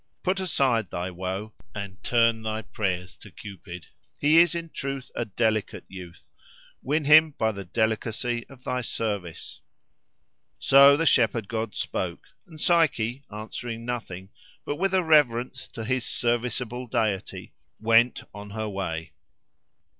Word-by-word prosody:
Put 190 Hz, +1 st, +1 dB
aside 130 Hz, -, +1 dB
thy 90 Hz, +2 st, -4 dB
woe, 95 Hz, +4 st, -5 dB, 0.2 s
and 100 Hz, -2 st, -7 dB
turn 115 Hz, -1 st, +3 dB
thy 110 Hz, 0 st, -3 dB
prayers 95 Hz, -4 st, -3 dB
to -, -, -13 dB
Cupid. 90 Hz, -4 st, -10 dB, 0.3 s
He 155 Hz, +3 st, +5 dB
is 170 Hz, -1 st, +5 dB
in 165 Hz, -1 st, -4 dB
truth 135 Hz, -1 st, -5 dB
a 120 Hz, -, -2 dB
delicate 110 Hz, 0 st, -1 dB
youth: 90 Hz, -2 st, -11 dB, 0.6 s
win 150 Hz, +2 st, 0 dB
him 155 Hz, 0 st, +7 dB
by 110 Hz, 0 st, +1 dB
the 100 Hz, -2 st, -7 dB
delicacy 115 Hz, +4 st, -1 dB
of 130 Hz, -2 st, -15 dB
thy 125 Hz, 0 st, -1 dB
service." 100 Hz, -8 st, -4 dB, 1.0 s
So 140 Hz, +1 st, +7 dB
the 165 Hz, -, 0 dB
shepherd 115 Hz, -6 st, +3 dB
god 110 Hz, -2 st, -3 dB
spoke, -, -, -4 dB, 0.2 s
and 160 Hz, -3 st, -13 dB
Psyche, 140 Hz, -7 st, +2 dB
answering 115 Hz, +2 st, -6 dB
nothing, 95 Hz, -6 st, -5 dB, 0.4 s
but 145 Hz, -, -3 dB
with 195 Hz, +1 st, +1 dB
a 185 Hz, -, +3 dB
reverence 130 Hz, -5 st, +2 dB
to 115 Hz, -3 st, -6 dB
his 130 Hz, +1 st, 0 dB
serviceable 120 Hz, +1 st, -2 dB
deity, 105 Hz, -4 st, -2 dB, 0.3 s
went 115 Hz, +2 st, +3 dB
on 105 Hz, 0 st, -9 dB
her 110 Hz, +1 st, -4 dB
way. 80 Hz, -6 st, -4 dB
115 Hz, 140 wpm, -26 LUFS, 105-135 Hz, 1.0 s, him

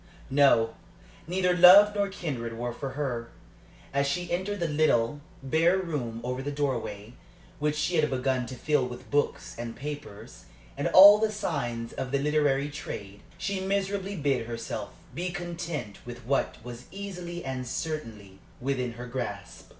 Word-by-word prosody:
No; 135 Hz, -5 st, +4 dB, 0.5 s
neither 180 Hz, 0 st, +1 dB
love 190 Hz, +4 st, +9 dB
nor 200 Hz, -1 st, 0 dB
kindred 130 Hz, -12 st, -4 dB
were 120 Hz, 0 st, -3 dB
for 135 Hz, +1 st, -5 dB
her. 120 Hz, -5 st, -2 dB, 0.6 s
As 140 Hz, 0 st, +2 dB
she 175 Hz, +5 st, -2 dB
entered 195 Hz, +3 st, -1 dB
the 170 Hz, -, 0 dB
little, 145 Hz, -3 st, +2 dB, 0.2 s
bare 165 Hz, +7 st, +3 dB
room 140 Hz, -11 st, -3 dB
over 125 Hz, +1 st, -3 dB
the 145 Hz, +2 st, -3 dB
doorway, 120 Hz, -7 st, -3 dB, 0.5 s
which 150 Hz, 0 st, 0 dB
she 165 Hz, +3 st, 0 dB
had 150 Hz, -1 st, +3 dB
begun 130 Hz, -1 st, 0 dB
to 130 Hz, -, -7 dB
fill 145 Hz, 0 st, +1 dB
with 125 Hz, 0 st, -10 dB
books 145 Hz, 0 st, 0 dB
and 120 Hz, -1 st, -5 dB
papers, 145 Hz, -8 st, -8 dB, 0.3 s
and -, -, -1 dB
all 205 Hz, +2 st, +10 dB
the 220 Hz, 0 st, +1 dB
signs 120 Hz, -, -3 dB
of 130 Hz, -, -4 dB
the 140 Hz, -, +1 dB
literary 145 Hz, -1 st, +1 dB
trade, 100 Hz, -8 st, -7 dB, 0.2 s
she 195 Hz, -1 st, -2 dB
miserably 195 Hz, +1 st, -1 dB
bid 135 Hz, -7 st, 0 dB
herself 115 Hz, -3 st, -5 dB, 0.2 s
be 180 Hz, +2 st, -2 dB
content 170 Hz, -, -5 dB
with 120 Hz, 0 st, -9 dB
what 135 Hz, +3 st, 0 dB
was 120 Hz, 0 st, -9 dB
easily 180 Hz, -3 st, -6 dB
and 130 Hz, -1 st, -4 dB
certainly 115 Hz, -, -5 dB, 0.2 s
within 125 Hz, -2 st, -2 dB
her 120 Hz, +1 st, -8 dB
grasp. 105 Hz, -8 st, -6 dB
140 Hz, 155 wpm, -28 LUFS, 120-175 Hz, 0.6 s, all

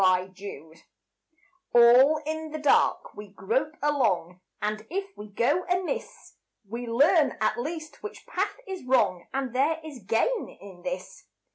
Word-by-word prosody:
=Life= 185 Hz, 0 st, +3 dB, 1.4 s
All 245 Hz, +6 st, +7 dB
in 315 Hz, +1 st, -3 dB
the 310 Hz, -, -5 dB
dark 295 Hz, -2 st, +2 dB
we 210 Hz, 0 st, -9 dB
grope 230 Hz, +10 st, -2 dB
along, 190 Hz, -, +1 dB, 0.2 s
And 215 Hz, +1 st, -3 dB
if 390 Hz, +3 st, -4 dB
we 210 Hz, -, -9 dB
go 245 Hz, -, +1 dB
amiss 365 Hz, +6 st, -3 dB, 0.3 s
We 235 Hz, +4 st, -5 dB
learn 285 Hz, +7 st, +3 dB
at 215 Hz, +1 st, +1 dB
least 310 Hz, +4 st, -6 dB
which 425 Hz, +1 st, -8 dB
path -, -, -2 dB
is 380 Hz, -6 st, -6 dB
wrong, 250 Hz, -8 st, +2 dB
And 265 Hz, -2 st, -3 dB
there 285 Hz, +5 st, +2 dB
is 295 Hz, -5 st, -8 dB
gain 230 Hz, -, 0 dB
in 190 Hz, -3 st, -12 dB
this. 270 Hz, +5 st, -6 dB
260 Hz, 140 wpm, -27 LUFS, 210-315 Hz, 1.4 s, All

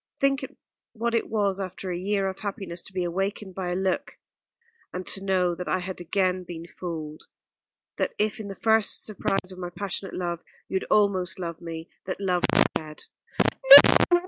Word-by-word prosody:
Think 275 Hz, 0 st, +2 dB, 0.5 s
what 235 Hz, +1 st, -2 dB
it 230 Hz, -, 0 dB
was 200 Hz, -3 st, 0 dB
after 185 Hz, 0 st, -5 dB
a -, -, -2 dB
year 195 Hz, +1 st, 0 dB
of 190 Hz, 0 st, -5 dB
happiness 195 Hz, -4 st, -5 dB
to -, -, -11 dB
be 185 Hz, -1 st, -2 dB
awakened 195 Hz, +3 st, -3 dB
by 180 Hz, -1 st, -4 dB
a 175 Hz, -, -1 dB
look, 190 Hz, 0 st, -2 dB, 0.7 s
and 180 Hz, 0 st, -5 dB
to 195 Hz, -, -1 dB
know 185 Hz, -2 st, +1 dB
that 180 Hz, +1 st, -6 dB
I -, -, +1 dB
had 185 Hz, 0 st, -6 dB
again 185 Hz, +1 st, 0 dB
been 170 Hz, -1 st, -8 dB
fooled, 160 Hz, -3 st, -7 dB, 0.7 s
and -, -, +3 dB
that -, -, -30 dB
if 210 Hz, 0 st, 0 dB
in 215 Hz, -, -6 dB
the 195 Hz, -, -7 dB
first 220 Hz, 0 st, +3 dB
surprise 195 Hz, -2 st, -1 dB
of 185 Hz, -, -10 dB
my 175 Hz, -1 st, -4 dB
passionate 195 Hz, +2 st, -5 dB
love 175 Hz, -1 st, -3 dB, 0.2 s
you 190 Hz, -, -1 dB
had -, -, -4 dB
almost 190 Hz, -3 st, +2 dB
loved 170 Hz, -2 st, -6 dB
me, 165 Hz, -1 st, -7 dB, 0.2 s
that 185 Hz, -, -4 dB
love 180 Hz, -3 st, 0 dB
was -, -, +6 dB
dead." 155 Hz, -1 st, -6 dB
185 Hz, 185 wpm, -26 LUFS, 175-200 Hz, 0.7 s, was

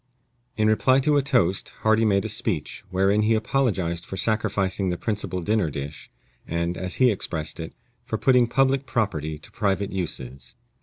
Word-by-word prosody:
In 110 Hz, 0 st, +3 dB
reply 130 Hz, +5 st, +4 dB
to 150 Hz, +2 st, +2 dB
a 145 Hz, -, +4 dB
toast, 125 Hz, -, +1 dB
Hardy 110 Hz, +1 st, +3 dB
made 100 Hz, -1 st, +2 dB
a -, -, 0 dB
speech, 105 Hz, -7 st, -3 dB
wherein 95 Hz, +3 st, +2 dB
he 110 Hz, +1 st, +3 dB
apologized 105 Hz, -8 st, 0 dB
for 95 Hz, -, -7 dB
sacrificing 100 Hz, -3 st, 0 dB
the 90 Hz, -, -1 dB
principal 105 Hz, -4 st, -2 dB
dinner 105 Hz, -2 st, +1 dB
dish, 70 Hz, +1 st, -7 dB, 0.4 s
and, 85 Hz, +1 st, -1 dB
as 95 Hz, 0 st, -3 dB
he 130 Hz, -2 st, +4 dB
expressed 80 Hz, -6 st, -3 dB
it, 80 Hz, -, -5 dB, 0.3 s
for -, -, -3 dB
putting 125 Hz, -2 st, +4 dB
public 135 Hz, +2 st, +2 dB
property 80 Hz, -9 st, -1 dB
to 75 Hz, -, -12 dB
private 100 Hz, -1 st, -1 dB
uses. 65 Hz, -9 st, -5 dB
100 Hz, 165 wpm, -24 LUFS, 85-110 Hz, 0.4 s, reply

